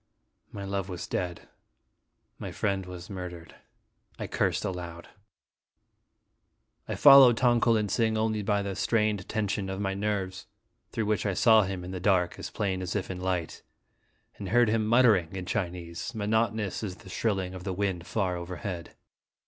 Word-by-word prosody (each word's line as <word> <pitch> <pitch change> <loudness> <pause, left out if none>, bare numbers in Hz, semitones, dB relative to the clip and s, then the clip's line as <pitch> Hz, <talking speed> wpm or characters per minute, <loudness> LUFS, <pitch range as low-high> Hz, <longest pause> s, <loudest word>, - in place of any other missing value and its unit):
My 100 -1 -6
love 100 0 -3
was 90 -1 -5
dead. 90 -2 -4 0.9
My - - -5
friend 95 -2 -1
was 90 -1 -8
murdered. 90 -3 -7 0.6
I - - -4
cursed - - 0
aloud. 85 -2 -6 1.8
I - - -3
followed 135 -4 +8
Tong 120 -2 +3
ko 115 - +4
lin 105 -2 +1
sing 110 +1 +1
only 110 -1 0
by 100 0 0
the 100 -1 -4
strained 105 -4 0
tension 105 -2 -1
of 95 0 -4
my 95 -1 -1
nerves, 95 -2 -3 0.4
through 110 - -1
which 105 0 0
I 100 - -1
saw 110 +2 +6
him 95 -1 -4
in 90 - -7
the 95 - -4
dark, 90 -2 +1
as - - -5
plain 95 -3 -2
as 90 +1 -4
if 95 -2 -2
in 90 - -6
light, 90 -3 -2 0.8
and 100 - -5
heard 120 +1 +4
him 110 -1 +1
mutter 120 -1 +6
ing 90 -1 -4
in 95 -1 -4
Chinese, 90 +1 -4
monotonous 110 -1 0
as 95 -4 -4
the 95 - -16
shrilling 95 -4 -1
of 90 -1 -8
the 95 - -3
wind 90 -3 -2
far 95 -5 -1
overhead. 90 0 -6
95 Hz, 170 wpm, -28 LUFS, 90-110 Hz, 1.8 s, followed